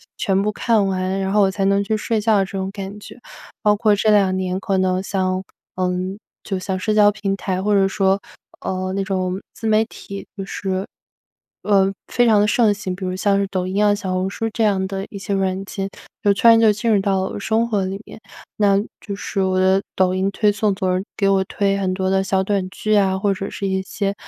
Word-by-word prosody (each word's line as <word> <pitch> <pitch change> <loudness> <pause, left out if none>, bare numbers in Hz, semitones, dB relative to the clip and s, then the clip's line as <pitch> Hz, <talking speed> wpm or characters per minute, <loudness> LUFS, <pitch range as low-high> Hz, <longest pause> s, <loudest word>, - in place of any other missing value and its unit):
全 195 -3 +1
部 210 - 0
看 220 -4 +2
完， 190 0 -1
然 195 0 -1
后 210 - +4
我 195 -1 +3
才 195 0 -1
能 200 +1 +3
去 215 +2 -1
睡 220 0 -1
觉 215 -1 +3
这 - - -12
种 190 0 -3
感 195 0 -7
觉。 210 - -12 0.4
包 210 0 +4
括 210 0 +3
这 210 +2 +1
2 195 -3 +4
年 185 -1 -1
可 195 -1 0
能 185 0 +1
像 185 -1 -1 0.3
嗯， 185 +1 -2 0.3
就 195 - -2
像 185 0 -3
社 215 +3 0
交 210 -1 +6
平 200 -1 -2
台， 190 -1 -2
或 210 +2 +1
者 195 -1 +3
说， 195 0 +1 0.4
呃， 185 0 -3
那 195 0 -1
种 185 -1 -1 0.2
自 225 - -5
媒 220 0 +4
体 200 -3 -9
就 195 - -4
是， 190 0 -3 0.8
呃， 195 -2 +3 0.2
非 245 - +2
常 220 -3 +5
的 210 - +3
盛 220 -1 +3
行， 195 -3 -5
比 190 - -9
如 185 - -2
像 195 +1 +1
是 200 - +1
抖 185 -2 -2
音 200 +3 +1
啊， 205 - +4
小 190 -2 -3
红 185 +1 0
书 225 +3 -3
这 225 - 0
样 195 -3 +2
的 195 0 -4
一 200 - -8
些 200 0 -3
软 190 0 -1
件， 195 0 -4 0.3
就 200 -1 +4
突 230 - +2
然 230 - +8
就 225 -1 +5
进 215 +3 -2
入 210 -3 +4
到 195 -1 -1
生 225 +3 +1
活 205 -4 0
里 190 +1 -4
面。 - - -11 0.4
那 200 -2 +3 0.3
就 200 - -4
是 200 -1 -3
我 185 0 +1
的 190 +1 +3 0.2
抖 185 -1 +3
音 190 +1 0
推 210 +1 +2
送 205 0 +1
总 185 -1 0
是 185 - -3
给 195 - +2
我 195 -1 +3
推 195 +1 0
很 190 -2 -1
多 190 0 -1
的 190 0 +2
小 190 0 +1
短 190 -1 -1
剧 215 +2 0
啊， 190 -2 +2
或 200 0 +1
者 195 +1 -5
是 200 - -4
一 190 0 0
些 195 +1 -2
195 Hz, 250 characters per minute, -20 LUFS, 190-205 Hz, 0.8 s, 然